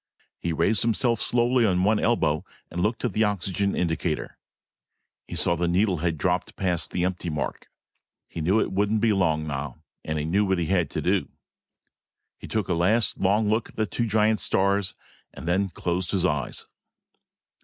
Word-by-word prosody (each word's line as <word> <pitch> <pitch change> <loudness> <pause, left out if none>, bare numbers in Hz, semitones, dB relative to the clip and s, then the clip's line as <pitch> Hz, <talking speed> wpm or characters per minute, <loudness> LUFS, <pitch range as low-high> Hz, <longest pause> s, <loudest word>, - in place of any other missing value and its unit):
He 85 - -2
raised 85 +7 +2
himself 115 0 +1
slowly 120 +1 +2
on 90 -4 +2
one 105 +2 +3
elbow 80 -10 +1 0.3
and 90 - -3
looked 110 +6 0
at 120 - -1
the 110 - +2
oxygen 100 -1 0
indicator. 80 -2 -2 0.9
He - - -6
saw 85 - +2
that 85 - -7
the 85 - +2
needle 95 +2 +2
had 80 0 -1
dropped 90 +3 -1
past 90 -3 0
the 90 - -1
empty 90 -1 -2
mark. 75 -5 -4 0.6
He 85 - -6
knew 95 +7 +3
it - - 0
wouldn't 105 +3 +1
be 115 -2 +3
long 80 -5 +1
now. 75 +1 -5 0.2
And 80 0 -3
he 75 - -2
knew 95 +6 +2
what 95 -2 +1
he 85 - 0
had 90 0 +1
to - - -3
do. - - +1 1.1
He - - -9
took 110 -4 -1
a - - +1
last 100 +7 +2
long 105 +3 +2
look 110 +2 0
at - - -17
the 110 - 0
two 115 +5 -2
giant 110 0 +2
stars, 100 0 +1 0.4
and - - -8
then 95 +3 +1
closed 90 +1 -2
his 95 -3 +1
eyes. 70 -5 -1
95 Hz, 185 wpm, -25 LUFS, 85-105 Hz, 1.1 s, one